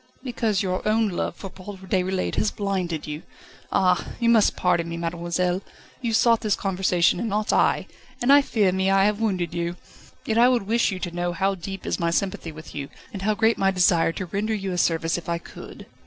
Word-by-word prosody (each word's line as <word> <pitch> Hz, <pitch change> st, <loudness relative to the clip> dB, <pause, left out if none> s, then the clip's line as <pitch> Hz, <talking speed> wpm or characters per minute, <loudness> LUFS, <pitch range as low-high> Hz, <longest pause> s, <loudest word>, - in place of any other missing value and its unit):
"Because 225 Hz, -6 st, 0 dB
your 185 Hz, -1 st, -1 dB
own 220 Hz, 0 st, +2 dB
love 175 Hz, -, -3 dB
for 195 Hz, -, -8 dB
Paul 195 Hz, +1 st, -9 dB
Déroulède 185 Hz, 0 st, -1 dB
has 215 Hz, -, +1 dB
blinded 185 Hz, -7 st, -3 dB
you 150 Hz, +1 st, -5 dB, 0.5 s
Ah! 180 Hz, -1 st, +3 dB, 0.2 s
you 235 Hz, -1 st, +2 dB
must 225 Hz, -3 st, +4 dB
pardon 170 Hz, -2 st, +1 dB
me, 170 Hz, -, -4 dB
mademoiselle; 175 Hz, +2 st, -1 dB, 0.4 s
you 235 Hz, -2 st, -1 dB
sought 230 Hz, +1 st, +4 dB
this 210 Hz, -3 st, +1 dB
conversation 180 Hz, -3 st, +1 dB
and 230 Hz, -, -2 dB
not 210 Hz, +1 st, 0 dB
I, -, -, +2 dB, 0.3 s
and 255 Hz, +3 st, +4 dB
I 285 Hz, -, +8 dB
fear 210 Hz, -8 st, +1 dB
me 190 Hz, +1 st, +1 dB
I 195 Hz, 0 st, +4 dB
have 210 Hz, +1 st, 0 dB
wounded 185 Hz, -6 st, -1 dB
you. 170 Hz, 0 st, -2 dB, 0.5 s
Yet 225 Hz, 0 st, +1 dB
I 245 Hz, +1 st, +7 dB
would 245 Hz, -4 st, +2 dB
wish 230 Hz, +4 st, +2 dB
you 190 Hz, -, -3 dB
to 180 Hz, -1 st, -4 dB
know 175 Hz, 0 st, -2 dB
how 195 Hz, +3 st, +1 dB
deep 195 Hz, +1 st, -7 dB
is -, -, -2 dB
my 170 Hz, -1 st, +1 dB
sympathy 170 Hz, -1 st, -2 dB
with 155 Hz, +1 st, -11 dB
you, 140 Hz, -1 st, -5 dB, 0.2 s
and 195 Hz, -, -6 dB
how 210 Hz, +2 st, +1 dB
great 225 Hz, +1 st, +2 dB
my 195 Hz, -, +3 dB
desire 180 Hz, -3 st, +3 dB
to 185 Hz, -, -4 dB
render 205 Hz, +5 st, -2 dB
you 195 Hz, -2 st, -3 dB
a 180 Hz, -, -3 dB
service 165 Hz, 0 st, +1 dB
if 170 Hz, -, -10 dB
I 170 Hz, -, 0 dB
could." 170 Hz, -, -11 dB
190 Hz, 215 wpm, -24 LUFS, 175-215 Hz, 0.5 s, I